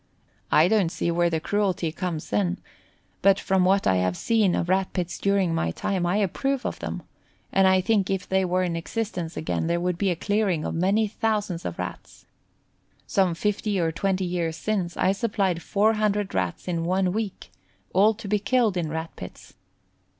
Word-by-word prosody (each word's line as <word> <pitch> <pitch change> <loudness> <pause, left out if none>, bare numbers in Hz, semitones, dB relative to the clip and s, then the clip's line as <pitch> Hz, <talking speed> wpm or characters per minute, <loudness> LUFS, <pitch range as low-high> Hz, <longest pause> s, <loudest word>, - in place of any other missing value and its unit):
I 155 +3 +6
don't 200 -4 +2
see 170 - -1
where 170 0 +2
the 160 -1 -1
cruelty 185 -2 0
comes 165 - -4
in, 95 -4 +1 0.6
but 195 0 +5
from 190 -1 +2
what 195 +1 +3
I 95 - +3
have 90 -1 0
seen 215 -5 +2
of 170 - -1
Rat 190 +1 +1
pits 175 -2 -3
during 195 -4 +1
my 165 - 0
time 180 - -1
I 175 - +1
approve 265 +7 -1
of - - -3
them, - - -5 0.5
and 195 0 +4
I 190 0 +4
think 200 -1 +1
if 195 -1 -2
they 190 0 +2
were 185 0 +1
in 175 -2 -1
existence 175 -2 -4
again 160 +1 -2
there 170 0 +1
would 180 0 -1
be 200 - +2
a 175 - +1
clearing 200 -3 0
of - - -2
many 200 +6 +2
thousands 210 -5 -2
of 85 - -4
Rats. - - -7 0.8
Some 185 -4 +1
15 210 +1 -1
or 165 -2 +1
20 190 +3 -1
years 170 -2 -2
since, 185 -1 -2
I 185 - +3
supplied 195 -4 0
400 210 0 +1
Rats 90 - -2
in 170 -2 -1
one 185 +1 +1
week, 215 -3 -4 0.4
all 210 +4 +4
to 220 -1 -9
be 210 +1 +1
killed 225 -3 +1
in 165 -3 -1
Rat 160 +1 -5
pits. - - -10
185 Hz, 185 wpm, -25 LUFS, 170-205 Hz, 0.8 s, I